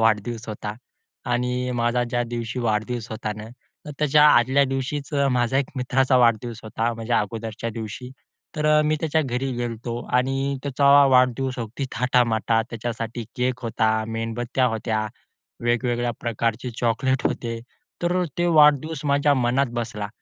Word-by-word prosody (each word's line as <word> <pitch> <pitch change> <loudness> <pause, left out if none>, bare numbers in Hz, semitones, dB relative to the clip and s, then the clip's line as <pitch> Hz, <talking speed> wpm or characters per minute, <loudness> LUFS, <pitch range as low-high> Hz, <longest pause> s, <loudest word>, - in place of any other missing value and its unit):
वाढदिवस 115 +1 0
होता. 105 0 -5 0.6
आणि 125 +1 0 0.3
माझा 120 +1 +1
ज्या 120 - +1
दिवशी 120 +1 -4
वाढदिवस 115 +1 -1
होता 110 -1 -3
ना, 105 - -7 0.4
तर - - -6
त्याच्या 150 0 +5
आदल्या 130 +1 +4
दिवशीच 135 +2 -3
अ, 140 -1 +2
माझ्या 125 0 +1
एक 135 - -2
मित्राचा 130 +1 +2
वाढदिवस 115 -1 +2
होता, 115 +2 -1
माझ्या 115 +1 0
अगोदरच्या 115 +1 -4
दिवशी. 115 +3 -7 0.5
तर 150 - 0
अ, 150 0 +5
मी 155 +1 +1
त्याच्या 160 0 +1
घरी 130 0 -2
गेलो 120 -1 -2
होतो 115 +1 -6 0.2
आणि 135 +1 0 0.3
त्याचा 140 0 0 0.2
वाढदिवस 130 0 +2
अगदी 120 +4 -4
थाटामाटात. 115 -2 +2
त्याच्यासाठी 115 0 -4
केक 125 0 -1
होता, 110 -1 +1 0.3
मेणबत्त्या 115 +3 -1
होत्या, 110 -1 -1 0.6
वेगवेगळ्या 120 0 +1
प्रकारचे 115 +1 -2
चॉकलेट 130 +3 +1
होते. 115 -1 -4 0.4
तर 180 +1 +1
तो 175 0 +2
वाढदिवस 150 0 +4
माझ्या 145 +1 +3
मनात 130 +3 +2
बसला. 105 -3 -4
120 Hz, 145 wpm, -23 LUFS, 115-135 Hz, 0.6 s, त्याच्या